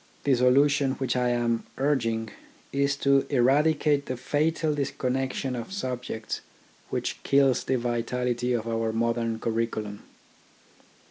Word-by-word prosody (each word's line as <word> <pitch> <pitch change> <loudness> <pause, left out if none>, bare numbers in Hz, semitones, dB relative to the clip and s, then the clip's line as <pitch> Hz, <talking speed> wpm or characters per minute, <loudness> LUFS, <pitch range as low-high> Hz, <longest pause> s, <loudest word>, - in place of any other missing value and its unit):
The 140 - +3
solution 135 +2 +4
which 130 -2 -2
I 125 -1 +2
am 120 -1 0
urging, 115 -6 0 0.4
is 140 0 +1
to 140 0 +4
eradicate 145 +2 +3
the 130 - -3
fatal 155 +4 0
disconnection 135 -2 -2
of 120 +8 -6
subjects 125 - -4 0.5
which - - -3
kills 135 -2 +3
the 130 - +1
vitality 120 +1 -1
of 115 -1 -2
our 115 -1 0
modern 115 0 0
curriculum. 110 -3 -2
125 Hz, 120 wpm, -27 LUFS, 115-140 Hz, 0.5 s, solution